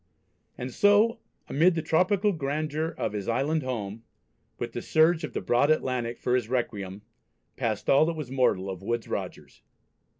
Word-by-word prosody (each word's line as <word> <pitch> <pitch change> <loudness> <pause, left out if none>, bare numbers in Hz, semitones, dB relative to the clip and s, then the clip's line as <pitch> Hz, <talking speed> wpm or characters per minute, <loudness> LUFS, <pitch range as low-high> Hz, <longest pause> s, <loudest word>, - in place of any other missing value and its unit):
And 125 0 -5
so, 210 +3 +4 0.3
amid 165 +5 +3
the 160 - -2
tropical 190 +5 +2
grandeur 155 0 -2
of - - -2
his 100 -2 -4
island 140 +7 +1
home, 115 -5 -4 0.6
with - - -4
the - - -5
surge 160 +1 +3
of 155 - -5
the - - -2
broad 125 +5 +2
Atlantic 125 -6 0
for 125 - -1
his 125 -3 +1
requiem, 105 -6 -3 0.5
passed - - -2
all 140 +3 +5
that 165 - -1
was 150 -5 -6
mortal 125 -8 +1
of 95 -2 -5
Woodes 115 +3 -2
Rogers. - - -6
135 Hz, 165 wpm, -27 LUFS, 120-160 Hz, 0.6 s, all